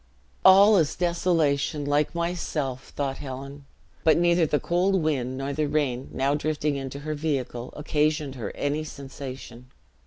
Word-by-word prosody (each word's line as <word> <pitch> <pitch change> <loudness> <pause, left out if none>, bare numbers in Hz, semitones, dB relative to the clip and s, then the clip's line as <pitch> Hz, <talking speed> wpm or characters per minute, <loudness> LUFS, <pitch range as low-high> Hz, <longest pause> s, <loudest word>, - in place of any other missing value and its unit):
"All 200 +3 +8
is 160 -4 +1
desolation, 165 -5 +1
like 145 +3 +1
myself!" 155 -6 -2
thought 135 -2 -2
Helen; 140 +1 -8 0.4
but 160 - +5
neither 170 -1 +3
the 150 - +1
cold 180 +3 +1
wind, 130 -4 -1
nor 135 +1 -3
the 150 +1 0
rain, 140 -4 -1
now 135 +2 0
drifting 150 0 -1
into 135 0 -5
her 155 +1 -3
vehicle, 135 -5 -3
occasioned 150 -1 0
her 125 -4 -5
any 145 +2 -1
sensation. 135 -4 -9
145 Hz, 145 wpm, -26 LUFS, 135-160 Hz, 0.4 s, All